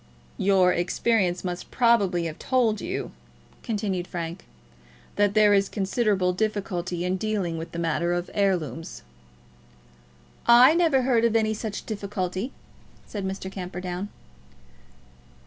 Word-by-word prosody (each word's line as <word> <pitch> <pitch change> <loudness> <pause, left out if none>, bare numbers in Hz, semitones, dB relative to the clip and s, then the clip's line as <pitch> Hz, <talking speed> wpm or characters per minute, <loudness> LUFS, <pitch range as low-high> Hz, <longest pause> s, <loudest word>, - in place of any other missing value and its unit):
"Your 190 -2 +4
experience 180 0 +1
must 180 -1 -5
probably 205 -8 +3
have 160 -1 -5
told 235 -5 +1
you," 375 +3 -4 0.5
continued 200 -6 -2
Frank, 170 0 -5 0.7
"that 205 0 +2
there 210 -1 +6
is 195 -1 +3
considerable 195 -2 +1
difficulty 185 -4 -2
in 185 +1 0
dealing 200 -5 -2
with 165 +1 -6
the - - -7
matter 170 +1 0
of 175 0 -1
heirlooms." 165 - -1 1.4
"I 245 +5 +8
never 325 -6 +3
heard 245 -3 +2
of 230 -1 +2
any 220 -1 +2
such 215 -1 -5
difficulty," 200 +1 -3 0.5
said 205 -2 -6
Mr. 190 0 -4
Camperdown. 180 +1 -5
195 Hz, 120 wpm, -25 LUFS, 180-220 Hz, 1.4 s, I